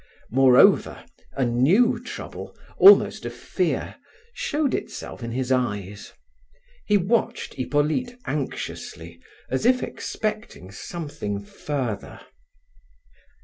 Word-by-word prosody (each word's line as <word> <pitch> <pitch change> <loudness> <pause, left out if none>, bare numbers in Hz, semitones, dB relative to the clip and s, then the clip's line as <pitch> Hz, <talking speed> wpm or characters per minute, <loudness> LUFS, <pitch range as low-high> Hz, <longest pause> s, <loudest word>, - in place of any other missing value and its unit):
Moreover, 130 0 +5 0.3
a 135 - 0
new 190 - +3
trouble, - - -8 0.2
almost 405 +1 +7
a - - -3
fear, - - -2 0.4
showed 295 -3 -1
itself - - -5
in 115 0 -5
his 130 +2 -2
eyes; 105 -6 -2 0.8
he 210 - +4
watched 210 +5 -1
Hippolyte 155 - -1
anxiously 85 - -5 0.3
as 130 - 0
if 250 +2 +3
expecting 215 - -5
something 105 - -5
further. 125 -5 -4
135 Hz, 95 wpm, -24 LUFS, -, 0.8 s, almost